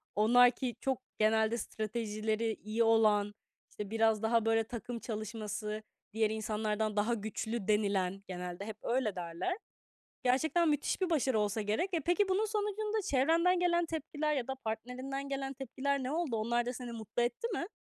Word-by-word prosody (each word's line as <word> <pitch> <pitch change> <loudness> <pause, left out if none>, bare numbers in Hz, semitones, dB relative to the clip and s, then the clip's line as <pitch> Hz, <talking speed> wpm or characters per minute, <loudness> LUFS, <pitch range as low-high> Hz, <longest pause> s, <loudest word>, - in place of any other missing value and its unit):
onlar 245 +4 +6
ki 250 -1 -3
çok 265 -1 0 0.2
genelde 220 +1 +3
stratejileri 220 0 -2
iyi 220 +2 +1
olan, 215 -2 +4 0.4
işte, 205 -1 -6
biraz 225 -1 +2
daha 225 0 +2
böyle 225 0 +3
takım 235 +1 -5
çalışması, 215 -1 -4 0.3
diğer 220 -1 +2
insanlardan 215 0 -1
daha 215 +3 +2
güçlü 220 0 -3
denilen 200 -2 +1
genelde 180 +1 -5
hep 220 0 -6
öyle 235 -4 0
derler. 175 - -3 0.7
Gerçekten 315 +7 +3
müthiş 295 +4 0
bir 370 -2 +1
başarı 265 -7 +2
olsa 210 +1 0
gerek. 215 - 0
E, 330 - +2
peki, 355 +6 +2
bunun 385 +3 +2
sonucunda 425 0 -1
çevrenden 330 +6 +3
gelen 345 -1 +3
tepkiler 305 -1 -2
ya 255 -4 -1
da 265 - -2
partnerinden 255 +5 -4
gelen 270 -1 -2
tepkiler 270 +1 -2
ne 255 - -2
oldu? 315 -7 0
Onlar 235 +2 0
da 245 - -1
seni 245 -1 -6
mutlu 230 +1 -2
etti 240 - -1
mi? 345 - -2
230 Hz, 160 wpm, -33 LUFS, 215-275 Hz, 0.7 s, onlar